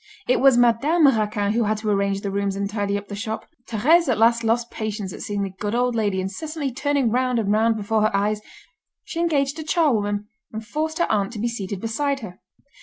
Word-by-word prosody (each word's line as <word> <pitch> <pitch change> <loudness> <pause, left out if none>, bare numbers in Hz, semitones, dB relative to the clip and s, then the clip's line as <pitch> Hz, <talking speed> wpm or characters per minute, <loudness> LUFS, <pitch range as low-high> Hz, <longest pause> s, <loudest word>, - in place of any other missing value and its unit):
It 250 - +3
was 270 -2 +5
Madame 260 +8 +4
Raquin 210 -5 +2
who 230 0 +1
had 215 +1 0
to 215 0 -3
arrange 200 -1 0
the 200 - -3
rooms 200 0 -1
and 200 0 -2
tidy 205 -1 -1
up 200 0 -8
the 205 - -6
shop. 220 +1 -4 0.2
Thérèse 295 +9 +3
at 245 - +2
last 230 +1 +4
lost 235 +1 0
patience 210 -4 -4
at - - -9
seeing 205 -1 -2
the 195 - -4
good 210 +2 -2
old 245 0 +1
lady 205 -4 0
incessantly 285 - -4
turning 280 -3 0
round 250 0 +1
and 210 -3 0
round 220 +2 +3
before 215 +1 0
her 215 -1 +2
eyes; 210 +1 0 0.6
she 335 - -6
engaged 295 -3 +1
a - - -4
charwoman, 215 -11 +1 0.2
and 220 0 -6
forced 315 +6 -3
her 345 - +1
aunt 205 0 0
to 215 - -6
be 235 - 0
seated 200 -4 -4
beside 275 +6 -1
her. 185 -3 -9
220 Hz, 220 wpm, -23 LUFS, 205-260 Hz, 0.6 s, was